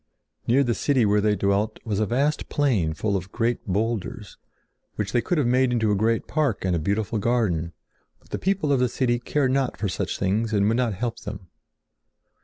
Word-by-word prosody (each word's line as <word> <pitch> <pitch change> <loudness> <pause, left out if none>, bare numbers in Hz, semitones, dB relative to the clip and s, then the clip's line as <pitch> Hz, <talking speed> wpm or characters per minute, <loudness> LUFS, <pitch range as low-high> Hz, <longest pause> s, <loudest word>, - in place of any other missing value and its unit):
Near 130 +4 +4
the 120 -3 +1
city 130 -1 +2
where 105 0 +3
they 105 0 +2
dwelt 100 +3 0
was 105 -3 -1
a 110 - +1
vast 140 +5 0
plain 105 - +1
full 100 +3 -1
of 95 0 -4
great 120 0 -1
boulders, 105 +1 -2 0.6
which 105 -2 -3
they 120 - +2
could 175 +5 -1
have 145 - +2
made 125 +1 +3
into 110 -3 +1
a - - +3
great 115 +3 +1
park 145 -11 -1
and 90 -2 +1
a - - 0
beautiful 100 +6 -1
garden; 100 -8 0 0.5
but - - -26
the - - -2
people 190 -6 0
of 135 - +2
the 125 -1 +2
city 120 -1 0
cared 130 +2 0
not 135 -1 0
for 105 - -1
such - - -3
things 110 +4 0
and 100 -1 +3
would 115 +2 +2
not 120 -5 0
help 115 +3 -3
them. 100 -3 -8
110 Hz, 210 wpm, -24 LUFS, 100-125 Hz, 0.6 s, Near